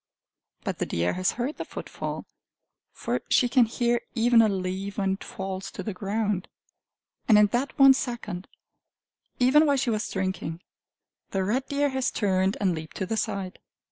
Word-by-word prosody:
But - - -3
the - - -1
deer 85 +1 0
has 185 +1 0
heard 250 +5 -3
the - - -3
footfall! - - -6 0.7
For - - -3
she 250 - +4
can 245 -1 +5
hear 240 +1 0
even 235 0 +5
a 220 - +4
leaf 190 +1 -3
when 195 -1 +1
it 195 - -6
falls 190 0 -5
to - - -7
the 215 - -3
ground. 200 0 -1 0.8
And 220 -4 +7
in 210 - +7
that 260 +4 -1
one 275 -1 +9
second, 235 -8 -4 0.9
even 285 +5 +5
while 285 -1 +3
she 255 -2 +1
was 215 +1 -1
drinking, 185 -3 -3 0.7
the 190 -1 -1
red 250 +8 0
deer 285 0 +1
has 265 -1 0
turned 190 -1 +1
and 190 -3 +2
leaped 160 -1 -7
to 190 - -1
the 225 - -2
side. 195 -3 -3
210 Hz, 175 wpm, -26 LUFS, 190-245 Hz, 0.9 s, one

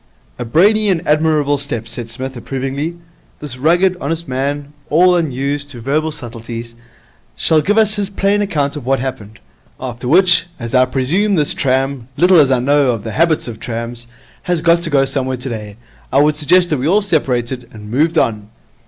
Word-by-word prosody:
'A 120 - -3
brainy 205 - +3
and 175 -4 -1
admirable 150 -2 +2
step,' 120 -5 -5
said 115 0 -6
Psmith, 130 +3 -6
approvingly. 135 +6 -4 0.4
'This 145 -4 -7
rugged, 175 +6 +3
honest 165 +3 -3
man, 140 +3 -3 0.2
all 180 +4 +4
unused 145 -2 -1
to 125 -4 -9
verbal 150 +6 -1
subtleties, 115 -3 -7 0.6
shall 160 -1 +3
give 205 +8 0
us 215 -1 +3
his 200 -1 -2
plain 200 +1 +1
account 150 -8 -1
of 150 - -6
what 135 +2 +1
happened. 110 -5 -6 0.4
After 125 -1 -6
which, 175 +5 +4
as 115 0 -6
I 130 0 +5
presume 175 +12 0
this 150 -4 +2
tram 135 -2 -1
little 180 0 +5
as 140 -3 +5
I 130 - +3
know 140 +2 +2
of 115 -4 -1
the 110 - -5
habits 160 +5 +1
of 115 -2 -7
trams 115 0 -6 0.4
has 175 -2 +2
got 170 0 +4
to 170 - -2
go 140 -2 +3
somewhere 130 -1 -2
today, 110 -5 -6 0.4
I 135 - +3
would 150 +1 +3
suggest 175 +4 +3
that 150 - +1
we 135 - -1
all 200 +5 +3
separated 125 - -1
and 105 -1 -11
moved 155 +7 +1
on.' 105 -5 0
140 Hz, 185 wpm, -16 LUFS, 125-165 Hz, 0.6 s, I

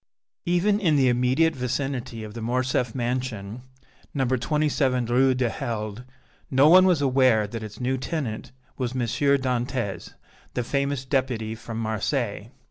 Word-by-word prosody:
Even 190 +4 +2
in 165 -7 +2
the 135 -3 +4
immediate 130 +6 +2
vicinity 125 -2 -3
of 105 -1 -8
the 115 - -7
Morcerf 125 +1 0
mansion, 120 -3 -3 0.5
No. 135 -2 +1
27 130 0 +1
Rue 130 +3 +3
du 125 -1 +1
Helder, 110 0 -4 0.4
no 135 +2 +5
one 185 +3 +7
was 170 -6 +3
aware 130 -5 +4
that 110 +2 -6
its 110 -1 -8
new 130 +1 -1
tenant 130 -6 -4 0.3
was 125 -1 -2
M. 130 - -2
Dantès, 125 -3 -1 0.4
the 125 - 0
famous 140 +1 -1
Deputy 130 -5 -1
from 115 0 -7
Marseilles. 110 0 -2
125 Hz, 140 wpm, -25 LUFS, 115-140 Hz, 0.5 s, one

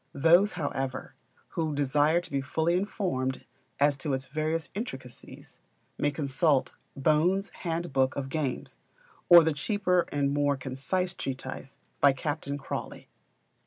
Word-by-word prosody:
Those, 170 +8 +5
however, 135 -5 -3 0.4
who 160 -3 -2
desire 145 +4 +2
to 175 - -12
be 140 -1 0
fully 160 +6 0
informed 180 -9 -2 0.3
as 145 0 +3
to 140 0 -3
its 130 0 -2
various 155 +3 -2
intricacies, 130 - -8 0.4
may 145 - +1
consult 145 0 +1 0.2
"Bohn's 160 +8 +2
Handbook 165 -6 -1
of 135 -1 -4
Games," 135 - -3 0.5
or 175 -1 +10
the 160 -1 +1
cheaper 180 +3 +1
and 140 -1 0
more 145 -1 +1
concise 135 +8 -2
treatise 135 0 -6 0.2
by 140 -1 +6
Captain 145 0 -3
Crawley. 135 - -6
145 Hz, 125 wpm, -28 LUFS, 135-170 Hz, 0.5 s, or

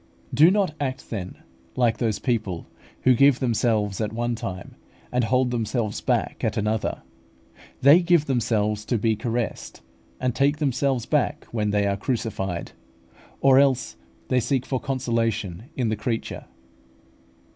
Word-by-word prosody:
Do 155 +6 +7
not 190 -4 +1
act, 135 -1 -4
then, 95 -5 -4 0.4
like 120 -3 +2
those 110 -4 0
people 100 -8 -2 0.4
who 130 - +6
give 140 +1 +5
themselves 110 -5 0
at 105 0 -1
one 120 +1 -1
time, 95 -5 -6 0.4
and 125 0 +1
take 125 +2 +2
themselves 115 -2 -2
back - - -1
at - - 0
another. 105 +1 -1 0.8
They 145 +5 +8
give 170 -3 +3
themselves 105 -5 0
to 120 - 0
be 110 +1 +1
caressed, 115 0 -4 0.4
and 125 - 0
take 140 +4 +2
themselves 135 -4 0
back - - 0
when 105 -3 -1
they 105 0 +1
are 100 0 0
crucified; 100 -6 -3 0.7
or 135 -1 +6
else 130 - +2 0.3
they 130 - +3
seek 130 +1 0
for 130 - -1
consolation 115 -7 -2
in 125 -4 0
the 110 - 0
creature. 110 +2 -4
120 Hz, 145 wpm, -24 LUFS, 105-130 Hz, 0.8 s, They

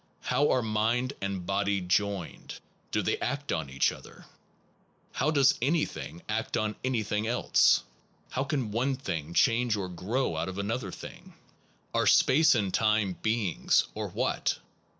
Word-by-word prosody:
How 145 - +1
are 125 - +2
mind 115 +4 0
and 100 -2 -3
body 100 +1 0
joined? 95 0 -2 0.3
Do - - 0
they - - 0
act 145 -1 -3
on 80 -4 -2
each 65 0 +2
other? - - -13 0.9
How 140 - 0
does 140 -3 +4
anything 140 - -1
act 110 +1 -2
on 110 -1 -1
anything 110 -4 -1
else? 120 +2 +3 0.5
How 130 - -1
can 135 -6 -2
one 130 +5 0
thing 85 - -5
change 120 -1 +3
or 95 -3 -3
grow 95 +4 -2
out 80 +3 -2
of 95 - -7
another 100 0 -2
thing? - - -11 0.6
Are - - +2
space 155 -1 +5
and/time 105 -1 +1
beings? 110 -5 +1
or - - -4
what? - - -1
110 Hz, 145 wpm, -29 LUFS, 95-125 Hz, 0.9 s, space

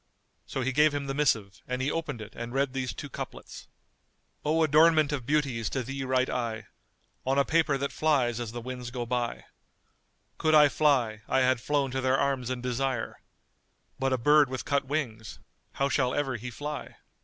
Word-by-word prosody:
So 135 - -3
he 130 +1 0
gave 150 +2 +4
him 140 -1 -2
the 135 - -3
missive 115 -9 0
and 125 0 -2
he 135 +3 0
opened 150 -8 -3
it 105 0 -9
and 120 +2 -6
read 135 -1 +1
these 130 -2 -2
two 145 - -7
couplets:— 140 - -8 0.8
"O 160 +2 +2
adornment 155 0 +5
of 130 -5 -3
beauties 140 -7 0
to 130 - -2
thee 135 +2 -4
write 130 0 +1
I 115 -3 -3 0.3
* - - -43
On 135 +1 +2
a 140 - +4
paper 155 -4 +2
that 140 +1 -2
flies 130 -7 +1
as 120 -2 -4
the 120 +1 -6
winds 125 0 -6
go 125 -1 -4
by: 120 0 -2 0.9
Could 155 0 +3
I 150 -1 +7
fly, 130 -8 +2
I 130 - +2
had 130 -2 +2
flown 140 -2 0
to 130 +1 -2
their 130 +1 +2
arms 135 -3 0
in 130 -1 -3
desire, 125 -1 -2 0.4
* - - -44
But 135 0 +1
a 130 - +2
bird 145 +2 +5
with 130 0 -4
cut 140 -1 +1
wings; 125 -7 -3 0.4
how 140 - +1
shall 130 -3 +1
ever 135 -3 -1
he 120 +2 -6
fly?" 145 +5 -6
130 Hz, 200 wpm, -28 LUFS, 125-145 Hz, 0.9 s, I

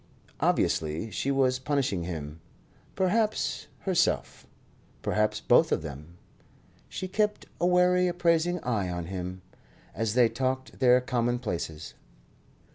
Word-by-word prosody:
Obviously 80 +8 0
she 135 - -2
was 130 -2 +2
punishing 130 - -1
him; 80 -2 -6 0.5
perhaps 210 +3 0
herself; 180 -3 0 0.6
perhaps 105 0 +1
both - - +4
of - - +1
them. 75 +3 -9 0.7
She 185 - -5
kept 210 +2 0
a 175 - +2
wary, 180 0 +4
appraising 175 0 +1
eye 105 -7 -1
on 85 -1 -4
him, 90 0 -6 0.5
as 110 0 -2
they 125 -2 +6
talked 130 +2 -3
their 125 -1 +5
commonplaces. 120 - -2
125 Hz, 115 wpm, -28 LUFS, -, 0.7 s, they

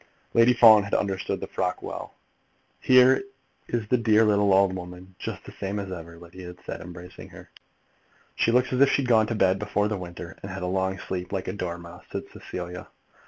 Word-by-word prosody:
Lady 115 +1 +6
Fawn 110 -3 +8
had 100 0 -2
understood 95 -2 -1
the - - -3
frock 90 +1 -2
well. - - -7 0.6
"Here 130 +4 +5 0.4
is 115 -3 -2
the 125 +2 +2
dear 110 -1 +4
little 105 -1 +3
old 95 0 +4
woman 90 +1 -9
just - - -6
the - - -10
same 100 +1 -4
as 100 -2 -6
ever," 85 -1 -8
Lydia 85 +2 -11
had 90 0 -12
said, - - -6
embracing 90 +1 -10
her. - - -14 0.8
"She 115 - +2
looks 125 +1 +2
as 130 - +1
if 140 - +7
she'd 135 -3 +1
gone 110 -3 +4
to 115 - -2
bed 95 -2 +2
before 105 0 0
the 105 - -2
winter, 85 -1 -9
and 100 - -7
had 95 0 -6
a - - -1
long 95 +1 -1
sleep, 90 0 -5
like 95 -2 -3
a - - -2
dormouse," 85 -2 -7
said - - -4
Cecilia. 90 0 -7
95 Hz, 205 wpm, -26 LUFS, 90-110 Hz, 0.8 s, Fawn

